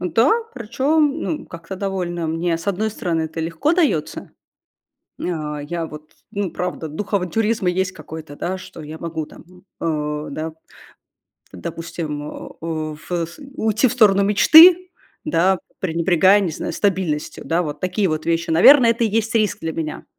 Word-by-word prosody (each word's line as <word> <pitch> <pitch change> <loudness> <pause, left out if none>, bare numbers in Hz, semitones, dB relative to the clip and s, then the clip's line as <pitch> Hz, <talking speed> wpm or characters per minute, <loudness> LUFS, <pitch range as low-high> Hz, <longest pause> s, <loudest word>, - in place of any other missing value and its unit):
Да, 225 - +2 0.2
причём, 280 +6 +1
ну, 305 - -3
как-то 170 +3 -8
довольно, 180 -3 -3
мне, 165 +1 -1
с 165 - -11
одной 205 +2 0
стороны, 170 -6 -2
это 160 +1 -5
легко 165 - 0
даётся. 305 - 0 0.9
А, 155 -4 -3
я 165 +3 -4
вот, 155 0 -11 0.2
ну, 200 -3 -2
правда, 180 -2 -4
дух 195 +8 -6
авантюризма 200 +2 +1
есть 185 +1 0
какой-то, 155 -2 -10
да, 185 +5 -3
что 185 -3 -11
я 155 +1 -8
могу 160 -1 -4
там, - - -15 0.4
э, 150 -2 -2
да, 155 +2 -4 1.0
допустим, 150 - -5 0.4
уф 155 -1 -5 0.5
уйти 220 +3 +2
в - - -2
сторону 205 -5 +4
мечты, 330 - +7 0.4
да, 190 - +2 0.2
пренебрегая, 180 +3 +3
не 190 -5 -1
знаю, - - -4
стабильностью, 180 -7 -1
да, 165 +2 +1
вот 150 -3 -5
такие 185 +3 0
вот 155 -2 -2
вещи, 170 0 0
наверное, 235 - +7
это 230 +1 -1
и - - +3
есть 220 0 -1
риск 215 -3 +1
для 165 0 -3
меня. 155 -1 -5
175 Hz, 150 wpm, -21 LUFS, 160-210 Hz, 1.0 s, мечты